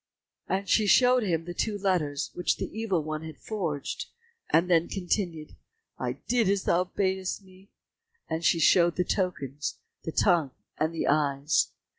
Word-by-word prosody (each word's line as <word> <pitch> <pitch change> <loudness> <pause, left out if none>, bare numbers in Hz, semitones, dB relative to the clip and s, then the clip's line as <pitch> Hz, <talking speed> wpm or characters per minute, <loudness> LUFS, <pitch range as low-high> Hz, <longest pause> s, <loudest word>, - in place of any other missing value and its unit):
and 195 +1 -1
she 215 -2 +3
showed 250 +4 +5
him 165 -6 -1
the 175 - -5
two 210 +3 -1
letters 175 -8 -1
which 180 - 0
the - - -5
Evil 205 -8 0
one 155 0 -4
had 160 -1 -8
forged, 170 -10 -4 0.4
and 170 +2 +3
then 170 -2 +3
continued, 175 -4 -3 0.4
"I - - -1
did 235 -5 +2
as 200 -1 +1
thou 180 +2 +2
badest 190 +1 -2
me," 190 +1 -19 0.6
and 160 +1 -3
she 165 - +3
showed 170 +1 +5
the 180 - +1
tokens, 150 - -2 0.3
the 160 - -4
tongue 165 -7 +2 0.3
and 160 +2 0
eyes. 145 0 +2
175 Hz, 155 wpm, -28 LUFS, 160-195 Hz, 0.6 s, showed